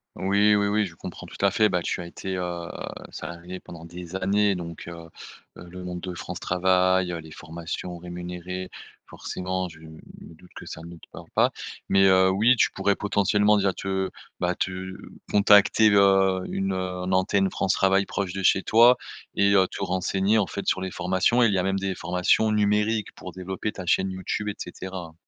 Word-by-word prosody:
Oui 100 +2 +3
oui 100 0 +2
oui, 105 +1 +1
je 85 - -14
comprends - - -9
tout - - -8
à 100 - +4
fait, 105 +2 +3
bah, 90 - 0
tu - - -2
as 85 - -7
été, 95 +2 -5
heu, 85 -1 -4 0.4
salarié 85 +3 -7
pendant 85 -2 -11
des 90 +1 -9
années 100 +1 +2
donc 85 -2 -7
heu - - -6 0.7
heu, - - -10
le 90 +1 -9
monde 90 -1 -5
de 90 -1 -6
France - - -6
Travail, 95 0 +2
heu, 85 - -4
les 80 -1 -11
formations 85 +2 -6
rémunérées, 90 +1 -6 0.4
forcément, 95 0 -4
je 80 -1 -14
me 80 0 -13 0.3
doute 90 +3 -18
que - - -9
ça 80 - -8
ne 85 +1 -10
te 85 - -17
parle - - -11
pas. - - +4 0.4
Mais, 95 0 +5
heu, 95 0 +5
oui, 110 +7 +4
tu - - +2
pourrais 100 +1 +1
potentiellement 105 +1 +2
déjà 95 -1 +1
te 95 0 -2 0.3
bah 90 0 0
te 95 +1 -4 0.3
contacter 105 +1 +6
le 95 -2 +4
une, 95 0 -1
heu, - - -2
un 90 0 -3
antenne 95 +1 +2
France 95 - 0
Travail 95 0 +3
proche 95 -3 -3
de 95 - -4
chez 95 +1 +3
toi 120 +3 +6 0.4
et 100 0 +3
heu, 95 -2 +5
te - - -6
renseigner 95 +3 +1
en 100 - +1
fait 100 - -5
sur 95 - +1
les 95 - -3
formations. 95 +8 +2
Il 110 -3 +3
y 95 - +2
a - - 0
même 95 +1 0
des 95 0 -2
formations 90 +5 +1
numériques 105 +1 +1
pour - - -10
développer 95 +3 -4
ta 95 -4 -8
chaîne 95 +2 +2
YouTube 95 +3 -4
et 100 - -4
cetera. 90 -2 -7
95 Hz, 200 wpm, -25 LUFS, 90-100 Hz, 0.7 s, contacter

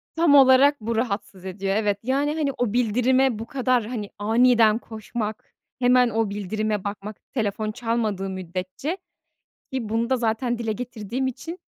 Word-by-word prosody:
Tam 325 -3 +4
olarak 270 0 +6
bu 230 +1 -2
rahatsız 205 -5 -3
ediyor, 195 +1 -2
evet. 205 -2 +1
Yani, 280 +4 0
hani, 295 -3 0
o 240 -3 0
bildirime 250 +1 +2
bu 225 - -5
kadar, 255 -3 +1
hani, 215 -4 -5
aniden 225 +1 +4
koşmak, 220 -1 -6 0.3
hemen 250 -1 +4
o 225 -1 0
bildirime 210 +1 -2
bakmak 205 +1 -6 0.2
telefon 215 -2 -1
çalmadığı 215 -4 -2
müddetçe 185 - -4 0.7
ki 250 -5 -3
bunu 230 +2 0
da, 260 - +2
zaten, 235 +1 0
dile 225 -2 -2
getirdiğim 245 +1 -4
için, 330 +8 -6
225 Hz, 150 wpm, -24 LUFS, 210-255 Hz, 0.7 s, olarak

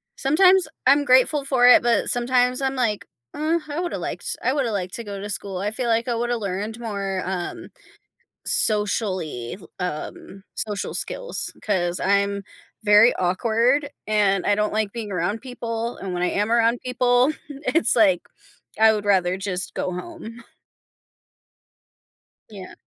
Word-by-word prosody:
sometimes 365 +6 +4 0.2
I'm 285 +2 +5
grateful 270 +3 +4
for 250 -3 +4
it, 250 - +8
but 235 -3 +2
sometimes 250 +1 +2
I'm, 270 0 -1
like, 215 -5 -1 0.3
"Uh, 320 +3 0
I 295 +3 -4
woulda 350 -1 -3
liked - - -4
I 255 - +2
woulda 265 -6 0
liked 185 -3 -3
to 235 - -6
go 200 -2 -7
to 205 +1 -6
school." 195 -2 -4
I 205 +2 -2
feel 240 +2 -3
like 230 +1 +1
I 240 - 0
woulda 240 +1 -1
learned 205 +3 -4
more, 200 -4 -3
um, 180 -1 -5 0.8
socially 190 - 0 0.2
um, 180 +3 -6
social 205 -2 -3
skills - - -4
'cause 180 -4 -1
I'm 200 0 +1 0.4
very 210 +3 +6
awkward, 230 +10 +1 0.2
and 200 -3 +2
I 205 - +3
don't 210 0 -1
like 215 -2 0
being 220 -4 -5
around 180 +5 -2
people. 235 -2 -5
And 190 -2 -5
when 175 - -3
I 180 - +2
am 210 +2 -1
around 235 0 +3
people, 250 +2 +2 0.2
it's, 290 -1 +1
like, 195 -6 +4 0.6
I 220 0 +6
would 205 -1 -3
rather 185 -2 +2
just 185 -1 -4
go 185 - -2
home. 235 - -8 2.1
Yeah. 195 -3 -10
220 Hz, 150 wpm, -23 LUFS, 195-250 Hz, 2.1 s, it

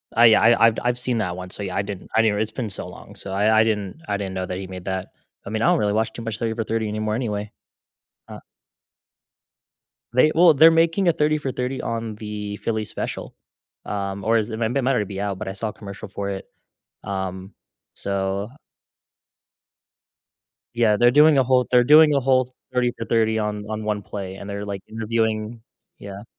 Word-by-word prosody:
Oh 115 - +5
yeah, 110 -2 +7
I 115 0 +6
I've 115 - +2
I've 120 0 +1
seen 125 -1 -1
that 90 -5 -2
one, 90 0 -7
so 100 - -7
yeah, 95 -2 -4
I 100 - +2
didn't 100 -2 -7
I 110 - +6
didn't, 105 -2 +1
it's 110 0 -1
been 115 -1 -4
so 95 - -6
long, - - -12
so 95 - -8
I 105 +3 +3
I - - +5
didn't 105 - -2
I 100 -1 -1
didn't 95 -2 -4
know 95 0 -2
that 90 0 -4
he 95 0 -6
made 90 -1 -9
that. 95 -1 -3 0.4
I - - -6
mean, 110 +1 -2
I - - +2
don't - - +4
really 105 -1 +1
watch 110 +1 0
too 115 - -7
much 115 -2 -4
30 115 -1 -1
for 115 - -2
30 110 0 -2
anymore 110 0 -2
anyway. 105 -3 -3 0.8
Uh - - -9 1.7
They, 155 +5 +5
well, 170 -1 +7
they're 160 +4 +7
making 165 +3 +2
a - - +6
30 155 0 +1
for 140 -3 -3
30 125 +1 -3
on 115 -1 -4
the 105 -1 -6
Philly 110 -1 -2
special, - - -5 0.5
um, 100 -1 -4
or 115 +1 +3
is 110 +1 -1
it 110 - -5
might 115 +1 -1
it 140 - +2
might 130 - +1
already 115 -6 +1
be 100 0 -6
out, 100 -2 -2
but - - -5
I 95 - -3
saw 110 +3 -3
a - - -9
commercial 100 0 -9
for 100 0 -5
it, 95 -1 -5 0.6
um, 95 0 -4 0.4
so 100 +1 -2 2.3
Yeah, 110 -3 +3
they're 120 +3 +5
doing 150 +2 +6
a 135 - +5
whole 125 0 +3
thir - - -16
they're 125 -1 +6
doing 150 +2 +7
a 140 - +3
whole 130 -1 +2 0.2
30 125 -1 +2
for 115 - -4
30 110 -1 +1
on 105 -1 -2
on 110 0 -4
one 105 -1 -1
play 95 -1 -6
and 100 +1 -9
they're 100 0 -4
like 100 -1 -5
interviewing, 110 0 -2 0.4
yeah. 100 +1 -9
110 Hz, 220 wpm, -23 LUFS, 100-120 Hz, 2.3 s, yeah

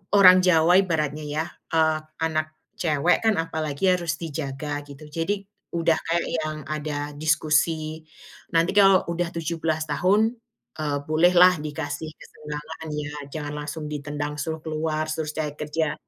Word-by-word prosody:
orang 185 -2 +9
Jawa 180 0 +5
ibaratnya, 155 -5 -1
ya. 155 +2 -1 0.3
Eee, 160 -1 +3 0.2
anak 155 -1 -1 0.2
cewek 160 +1 +2
kan, 220 - +4
apalagi 160 +1 0
harus 170 -2 -2
dijaga, 145 -2 -4
gitu. 145 +1 -12
Jadi, 195 +5 -2 0.2
udah 165 -1 +1
kayak 170 +1 -1
yang 155 0 -3
ada 150 -1 -4
diskusi, 155 +1 +1 0.6
nanti 165 +2 +4
kalau 195 -2 +6
udah 170 0 -1
17 165 -1 -1
tahun, 185 +9 +2 0.5
eee, 145 -2 0
bolehlah 175 +3 +5
dikasih 150 +1 -4
kesenggangan, 150 +1 -8
ya. 145 0 -4 0.2
Jangan 145 0 -5
langsung 150 +1 -5
ditendang, 145 0 -4
suruh 160 +1 -4
keluar, 155 0 -1
trus 155 -1 -3
cari 155 -2 -2
kerja. 150 0 -1
155 Hz, 135 wpm, -25 LUFS, 150-165 Hz, 0.6 s, orang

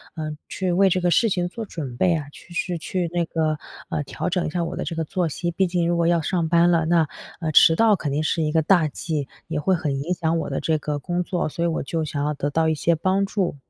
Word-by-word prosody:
呃， 155 -1 -4
去 185 -2 -2
为 195 +2 +4
这 185 0 +1
个 175 - +2
事 225 +5 +3
情 175 -2 0
做 225 +3 -6
准 140 -10 -6
备 180 -2 +3
啊， 145 -2 -4
去 175 - -14
去 175 -1 -1
去 175 +1 -2
那 175 -1 0
个， 155 -2 0 0.3
呃， 150 - -1
调 140 - -4
整 180 0 0
一 - - -1
下 175 0 -1
我 165 - -4
的 - - -3
这 165 - -4
个 165 - -1
作 175 +1 -1
息， 170 +3 -3
毕 190 +3 +1
竟 175 -1 0
如 175 0 +1
果 170 - +2
要 170 -1 +3
上 170 0 0
班 170 +1 +4
了， 165 -2 +2
那， 165 -2 +3 0.3
呃， 160 -1 -1
迟 160 +2 +7
到 220 0 +5
肯 145 -6 -3
定 150 +2 0
是 160 0 0
一 150 - 0
个 160 0 +3
大 165 -1 +4
忌， 150 -2 -3 0.2
也 160 -2 -2
会 190 +5 +2
很 145 -5 -2
影 170 +6 -1
响 165 -1 0
我 - - -3
的 - - -1
这 160 -1 +1
个 150 -1 -3
工 175 +3 -2
作， 175 -3 -2
所 170 +3 -2
以 - - +3
我 165 - -1
就 160 +2 -2
想 145 -1 -3
要 150 +1 0
得 145 +1 -2
到 160 +1 +2
一 160 - +1
些 170 +3 +2
帮 190 +4 +1
助。 195 -5 -1
165 Hz, 300 characters per minute, -23 LUFS, 155-175 Hz, 0.3 s, 迟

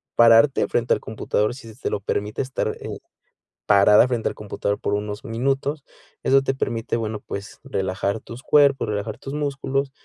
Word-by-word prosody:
pararte 115 +4 +6
frente 120 0 +2
al - - 0
computador 110 0 -1
si 130 -4 -12
se 125 - -22
te - - -1
lo - - -2
permite 105 +1 -2
estar, 130 +1 -3
eh, - - -6 0.7
parada 105 +2 +6
frente 120 -3 -1
al - - -8
computador 100 -1 -3
por 100 - -2
unos 105 0 -3
minutos. 135 +5 -1 0.4
Eso 135 0 +4
te 135 - 0
permite, 115 -3 -2
bueno, 110 -2 -3
pues, 100 +1 -7
relajar 100 -4 -2
tus 120 +3 -11
cuerpo, 140 -2 +4
relajar 105 +1 -3
tus 135 - -8
músculos, 140 -2 -2
115 Hz, 175 wpm, -23 LUFS, 105-135 Hz, 0.7 s, pararte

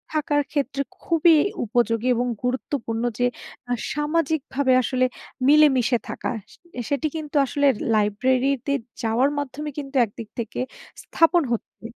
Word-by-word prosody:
থাকার 295 -1 +2
ক্ষেত্রে 280 -1 -1 0.2
খুবই 330 0 +4 0.3
উপযোগী 230 +1 +1
এবং 245 +1 0 0.2
গুরুত্বপূর্ণ 250 -2 -2 0.2
যে, 245 - +3 0.4
আ - - -2 0.2
সামাজিকভাবে 295 -3 0
আসলে 255 +1 +1 0.4
মিলেমিশে 270 -5 +5
থাকা। - - -3 0.2
সে - - -21 0.3
সেটি 290 +2 0
কিন্তু 305 -1 -6
আসলে 285 +2 0 0.3
লাইব্রেরিতে 255 +6 +1 0.3
যাওয়ার 235 +5 +2
মাধ্যমে 285 +1 -4
কিন্তু 275 -1 -6
একদিক 220 +1 -10
থেকে 230 -2 -4 0.4
স্থাপন 340 +1 +3
হচ্ছে। 230 0 -5
270 Hz, 120 wpm, -23 LUFS, 240-295 Hz, 0.4 s, মিলেমিশে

